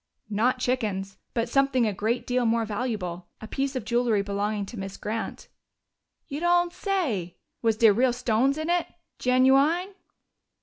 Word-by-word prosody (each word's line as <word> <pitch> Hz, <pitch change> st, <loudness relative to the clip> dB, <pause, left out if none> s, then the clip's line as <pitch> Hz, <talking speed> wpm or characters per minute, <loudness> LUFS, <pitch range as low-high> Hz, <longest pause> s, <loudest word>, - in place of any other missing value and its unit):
"Not 240 Hz, +5 st, +2 dB
chickens 210 Hz, -7 st, -2 dB, 0.2 s
but 230 Hz, 0 st, 0 dB
something 270 Hz, -1 st, +2 dB
a 210 Hz, -, 0 dB
great 220 Hz, +5 st, -1 dB
deal 250 Hz, 0 st, +1 dB
more 230 Hz, 0 st, +2 dB
valuable. 205 Hz, -6 st, -3 dB
A 220 Hz, -, -8 dB
piece 275 Hz, +3 st, -2 dB
of 250 Hz, -5 st, -3 dB
jewelry 235 Hz, -3 st, +2 dB
belonging 205 Hz, +1 st, -2 dB
to 220 Hz, +2 st, -8 dB
Miss 195 Hz, 0 st, -6 dB
Grant." 220 Hz, +2 st, -4 dB, 0.8 s
"You 285 Hz, -1 st, -4 dB
don't 350 Hz, 0 st, +2 dB
say! 270 Hz, -, -2 dB, 0.2 s
Was 225 Hz, -2 st, +2 dB
dere 225 Hz, -2 st, +6 dB
real 250 Hz, +4 st, +3 dB
stones 250 Hz, +3 st, +1 dB
in 315 Hz, +1 st, -3 dB
it 350 Hz, 0 st, +1 dB, 0.3 s
genu 255 Hz, +1 st, +4 dB
ine?" 345 Hz, +8 st, +1 dB
235 Hz, 160 wpm, -26 LUFS, 210-270 Hz, 0.8 s, dere